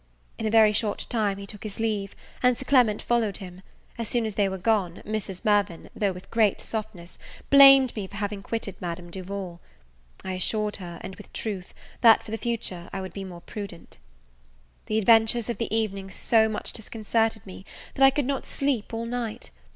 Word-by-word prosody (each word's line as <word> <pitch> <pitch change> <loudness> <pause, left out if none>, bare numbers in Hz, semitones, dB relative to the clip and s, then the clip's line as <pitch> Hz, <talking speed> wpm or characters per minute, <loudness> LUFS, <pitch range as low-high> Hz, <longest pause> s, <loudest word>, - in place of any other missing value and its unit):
In 225 - -1
a - - +1
very 220 -1 +6
short 210 -1 0
time 210 -5 0
he 200 - -7
took 205 0 -10
his 215 -1 -6
leave, 210 -3 -2 0.3
and 250 -1 +4
Sir 265 - -6
Clement 245 -7 +3
followed 230 -5 +1
him. 185 -1 -10 0.4
As 230 - -2
soon 240 -2 0
as 215 - -3
they 200 -1 +1
were 190 - -4
gone, 190 -3 0
Mrs. 200 -3 -4
Mirvan, 205 -5 +1
though 200 -2 +1
with 180 0 -11
great 220 -3 +3
softness, 210 -6 -6 0.3
blamed 275 -2 +8
me 205 -3 -4
for 200 - -13
having 205 -1 -3
quitted 215 -1 -4
Madame 175 0 -5
Duval. 185 -1 -6 0.6
I 190 - -4
assured 210 +3 0
her, 175 -3 -8
and 190 - -7
with 210 - -13
truth, 195 -5 -5 0.3
that 225 -2 +7
for 215 - -10
the 225 - -3
future 210 -7 -3
I 195 - -4
would 190 -2 -6
be 195 - -6
more 180 -2 -9
prudent. 190 - -9 0.9
The 215 - 0
adventures 225 +1 +4
of 235 - -3
the 230 - -2
evening 200 -3 -1
so 220 +3 +3
much 215 - -4
disconcerted 225 0 -1
me, 190 -1 -10 0.3
that 270 - +1
I 270 - +9
could 285 0 -1
not 275 0 -2
sleep 260 -6 -1
all 230 +1 -3
night. 235 -2 -4
210 Hz, 195 wpm, -26 LUFS, 195-225 Hz, 0.9 s, I